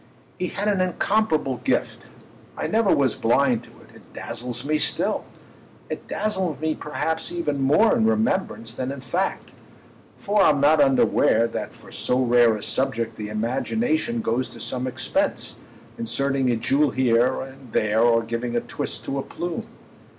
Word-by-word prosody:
He 180 - -1
had 205 +3 -3
an 200 -3 +2
incomparable 180 - +1
gift; - - -1 0.5
I - - -2
never 220 -2 +2
was 135 -4 +3
blind 125 +1 +2
to - - -16
it—it - - -19
dazzles 125 +2 -5
me 155 +1 +1
still. - - +1 0.7
It - - -6
dazzles 190 - -2
me 160 0 0
perhaps 160 +2 -3
even 150 -5 -2
more 155 +12 +4
in 225 -2 +2
remembrance 195 - 0
than 130 +2 -3
in 140 -1 -7
fact, 135 - -2 0.7
for 205 0 +1
I'm 150 -6 +4
not 145 +2 +5
unaware 135 -3 +3
that - - -5
for - - -15
so 125 - 0
rare 120 -2 +4
a 105 - -6
subject 115 -4 0
the 105 -1 -6
imagination 225 - -1
goes 125 - -1
to - - -11
some 130 0 -3
expense, 130 - -1 0.4
inserting 135 +3 +1
a 120 - +2
jewel 135 +6 +2
here 125 0 +2
and 130 -2 -11
there 110 +1 +2
or 115 -1 +4
giving 115 +1 -3
a 120 - +1
twist - - -5
to 135 - -2
a - - 0
plume. 175 +4 -5
135 Hz, 160 wpm, -23 LUFS, 120-175 Hz, 0.7 s, not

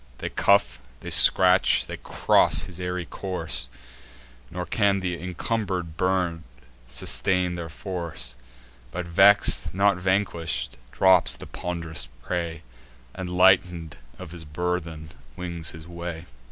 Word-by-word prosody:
They - - -5
cuff, 100 0 +2 0.2
they - - -7
scratch, 90 0 +6
they - - -7
cross - - +2
his 90 -1 -10
airy 90 0 -3
course; 90 -9 -3 0.8
Nor 90 0 -5
can 100 +2 +1
th' - - -10
incumber'd 90 -1 -3
bird 90 -2 0 0.5
sustain 90 +8 +1
their 85 -2 -6
force; 85 -5 -4 0.5
But 90 -1 -5
vex'd, 95 +3 +4
not 100 -1 +3
vanquish'd, 95 -5 -1
drops 95 -2 +3
the - - -10
pond'rous 80 -7 -4 0.2
prey, 85 -2 -4 0.5
And, 95 -1 -6
lighten'd 90 -3 +2 0.2
of 90 -4 -10
his 85 -2 -9
burthen, 80 0 -4 0.3
wings 85 -4 -4
his 80 0 -8
way. 85 -1 -7
90 Hz, 120 wpm, -25 LUFS, 85-95 Hz, 0.8 s, scratch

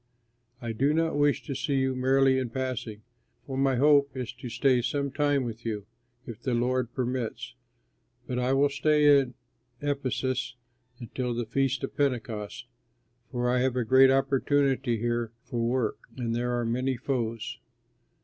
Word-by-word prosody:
I 115 - -2
do 140 +7 +1
not 165 0 +1
wish 145 0 +2
to 140 - -4
see 140 +2 -1
you 130 -1 +1
merely 130 +1 +3
in 130 -2 -2
passing, 115 -4 -4 0.4
for 135 - -5
my 135 0 +2
hope 140 0 +4
is 125 -3 -4
to 125 - -8
stay 130 +1 +2
some 140 +3 -1
time 145 -1 +1
with 115 -1 -6
you, 105 -3 -3 0.4
if 115 -1 -9
the 130 -2 0
Lord 125 0 0
permits. 125 -2 -3 0.7
But 125 - -2
I 125 +1 +1
will 140 +1 +4
stay 150 0 +4
in 130 -3 -3 0.4
Ephesus 130 -3 -2 0.4
until 120 0 -4
the 120 0 -2
Feast 135 +2 0
of - - -4
Pentecost, 120 -6 -2 0.7
for 125 0 -1
I 125 +1 +2
have 130 0 +1
a 125 -2 0
great 130 +3 +6
opportunity 135 -2 +2
here 120 0 -2
for 125 -2 -4
work, 115 -1 0 0.2
and 115 -2 -2
there 120 +1 -1
are 120 - -1
many 125 +3 0
foes. 115 -4 -3
130 Hz, 160 wpm, -28 LUFS, 120-135 Hz, 0.7 s, great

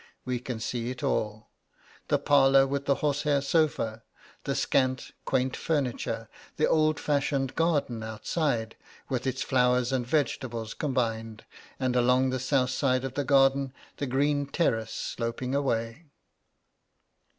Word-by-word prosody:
We 125 -1 -1
can 125 -2 -5
see 120 +1 -3
it 125 -1 -6
all: 105 0 -2 0.6
the - - +3
parlour 135 -1 +5
with 140 +1 -2
the 140 - +3
horsehair 145 0 +2
sofa, 140 -6 0 0.4
the - - -1
scant, 130 -1 +1
quaint 130 -1 0
furniture, 125 -6 -2 0.3
the 155 - +3
old 155 -1 +2
fashioned 140 -2 0
garden 145 -8 +1
outside, 110 +2 -2 0.3
with 130 0 -2
its 130 0 -1
flowers 125 -1 +2
and 130 -2 0
vegetables 120 -6 -1
combined, 115 -6 -2 0.3
and 130 -2 0
along 125 +1 +3
the 130 - -1
south 130 0 +1
side 130 -2 +1
of 135 -1 -4
the 145 - -1
garden 135 -1 +3 0.2
the 140 - -2
green 140 +2 +1
terrace 115 -8 0
sloping 120 +2 -3
away. 135 +1 -1
130 Hz, 135 wpm, -28 LUFS, 120-140 Hz, 0.6 s, parlour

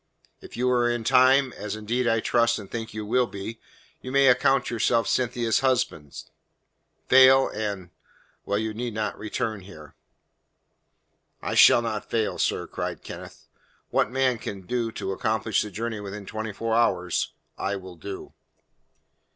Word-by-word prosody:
If - - -11
you 125 +1 +1
are 120 -1 +2
in 120 -1 -2
time, 130 +1 +4
as 105 0 -5
indeed 120 +4 -1
I 115 -1 +2
trust 115 0 +2
and 100 -3 -10
think 115 -1 -5
you 110 -1 -6
will 125 +3 +2
be, 110 +3 -7 0.4
you 130 - -7
may 140 0 +5
account 125 +2 +3
yourself 115 0 +1
Cynthia's 120 -2 +1
husband. 120 - -1 0.8
Fail 130 +1 +7
and 100 -4 -4 0.5
well, 100 - -1
you 110 0 -2
need 120 0 -4
not 110 -1 -2
return 110 0 -3
here." 80 -6 -13 1.5
"I - - -4
shall 120 - +7
not 110 -2 -4
fail, 110 -2 -1
sir," - - 0
cried - - -5
Kenneth. - - -10 0.5
"What - - +2
man 130 -2 +1
can 100 -2 -6
do 115 +4 -2
to 95 - -4
accomplish 110 +2 0
the 105 - -4
journey 110 +2 -4
within 100 0 -7
twenty 110 +2 -5
four 115 +3 -3
hours, 90 -7 +1 0.2
I 100 - -2
will 95 -2 -9
do." 95 +4 -8
110 Hz, 155 wpm, -25 LUFS, 105-125 Hz, 1.5 s, Fail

